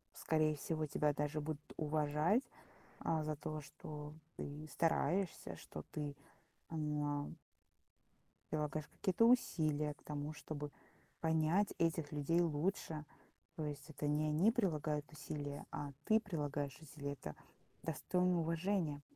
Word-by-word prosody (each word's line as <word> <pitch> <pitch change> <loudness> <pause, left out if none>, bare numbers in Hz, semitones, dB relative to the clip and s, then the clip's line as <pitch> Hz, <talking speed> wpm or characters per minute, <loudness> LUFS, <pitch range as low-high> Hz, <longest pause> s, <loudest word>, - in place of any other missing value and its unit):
Скорее 155 -1 +3
всего, 155 +2 -1
тебя 150 0 +2
даже 150 +1 0
будут 150 0 -4
уважать, 155 - +3 0.6
а, 160 -1 +1
за 155 -1 -1
то, 155 +1 -3
что 150 0 -7 0.2
ты 150 +2 -5
стараешься, 170 +2 +1
что 75 - -7
ты, 145 -2 -3 0.5
м 150 -2 -1 1.1
Прилагаешь 150 0 0
какие-то 190 +4 +3
усилия 155 - +4
к - - -25
тому, 150 +1 -3
чтобы 150 -1 -5 0.5
понять 160 +5 +3
этих 165 -2 +2
людей 150 +4 +3
лучше. 160 -1 0 0.5
То 155 - -2
есть, 145 0 -5
это 150 -1 -2
не 150 +1 +3
они 160 +9 +5
прилагают 155 - +1
усилия, 145 -1 -4
а 145 -1 -3
ты 220 0 +5
прилагаешь 145 - -2
усилия. 145 -2 -5
Это 75 - -6 0.5
достойно 180 -1 +2
уважения. 165 -2 +1
150 Hz, 120 wpm, -39 LUFS, 145-165 Hz, 1.1 s, они